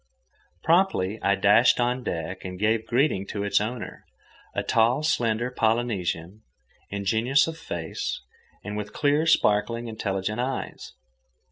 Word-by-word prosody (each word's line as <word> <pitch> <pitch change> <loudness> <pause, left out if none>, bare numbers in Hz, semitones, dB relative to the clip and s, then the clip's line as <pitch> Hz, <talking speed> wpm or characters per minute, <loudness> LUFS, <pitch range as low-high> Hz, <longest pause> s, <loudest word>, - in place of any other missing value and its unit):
Promptly 160 - +2
I 100 - +3
dashed 105 +6 +4
on 125 +1 +1
deck 90 +1 -4
and 90 0 -6
gave 110 +3 +1
greeting 120 -6 +1
to 100 0 -4
its 100 0 +2
owner, 115 +2 -5 0.5
a - - 0
tall, 115 +6 +2
slender 120 -4 0
Polynesian, 110 -6 -1 0.5
ingenuous 110 +7 +2
of 165 - -5
face, 85 - -4 0.4
and 105 0 -5
with 105 0 -5
clear, 150 +2 +2
sparkling, 115 -2 +2
intelligent 105 -1 -3
eyes. 130 +1 -4
110 Hz, 125 wpm, -25 LUFS, 100-125 Hz, 0.5 s, dashed